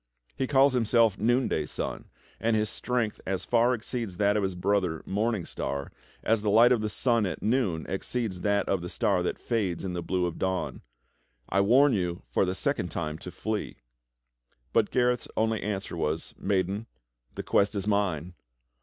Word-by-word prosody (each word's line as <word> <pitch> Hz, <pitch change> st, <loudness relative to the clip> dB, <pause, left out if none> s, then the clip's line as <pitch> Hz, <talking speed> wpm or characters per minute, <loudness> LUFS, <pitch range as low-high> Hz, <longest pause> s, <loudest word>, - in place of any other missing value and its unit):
He 130 Hz, -, -1 dB
calls 135 Hz, 0 st, +5 dB
himself 115 Hz, -3 st, +3 dB
Noonday 120 Hz, -, +1 dB
Sun, -, -, -4 dB, 0.3 s
and 115 Hz, 0 st, +1 dB
his 105 Hz, 0 st, 0 dB
strength 120 Hz, -4 st, -1 dB
as 95 Hz, -1 st, -2 dB
far 120 Hz, +1 st, +3 dB
exceeds 115 Hz, -4 st, -5 dB
that 100 Hz, +1 st, +3 dB
of 105 Hz, -, +2 dB
his 95 Hz, -2 st, -1 dB
brother, 90 Hz, -3 st, 0 dB
IMorning 105 Hz, -2 st, 0 dB
Star, 70 Hz, 0 st, -4 dB, 0.3 s
as 115 Hz, -1 st, +2 dB
the 105 Hz, -, 0 dB
light 115 Hz, +4 st, +6 dB
of 120 Hz, -3 st, +3 dB
the 110 Hz, -, -1 dB
sun 115 Hz, -1 st, +2 dB
at 85 Hz, -, -5 dB
noon 105 Hz, -9 st, +1 dB
exceeds 95 Hz, -1 st, -3 dB
that 100 Hz, 0 st, +1 dB
of 95 Hz, -3 st, 0 dB
the 90 Hz, -, -5 dB
star -, -, +1 dB
that -, -, -2 dB
fades 100 Hz, -7 st, -1 dB
in 90 Hz, -, -3 dB
the 90 Hz, -, -3 dB
blue 90 Hz, +1 st, 0 dB
of 85 Hz, -1 st, -4 dB
dawn. 95 Hz, 0 st, -2 dB, 0.7 s
I 100 Hz, -, +3 dB
warn 130 Hz, +7 st, +5 dB
you 90 Hz, -3 st, -2 dB
for -, -, +2 dB
the 95 Hz, 0 st, -2 dB
second 95 Hz, -3 st, -1 dB
time 80 Hz, -2 st, -4 dB
to -, -, -8 dB
flee." 110 Hz, +3 st, -3 dB, 1.0 s
But 110 Hz, -2 st, +3 dB
Gareth's 125 Hz, -1 st, +1 dB
only 110 Hz, -1 st, +1 dB
answer 100 Hz, -3 st, -3 dB
was: 80 Hz, -1 st, -2 dB
"Maiden, 100 Hz, +3 st, -1 dB, 0.5 s
the -, -, -4 dB
quest 100 Hz, +1 st, +2 dB
is 100 Hz, -1 st, -2 dB
mine. 90 Hz, -5 st, 0 dB
100 Hz, 180 wpm, -28 LUFS, 90-115 Hz, 1.0 s, light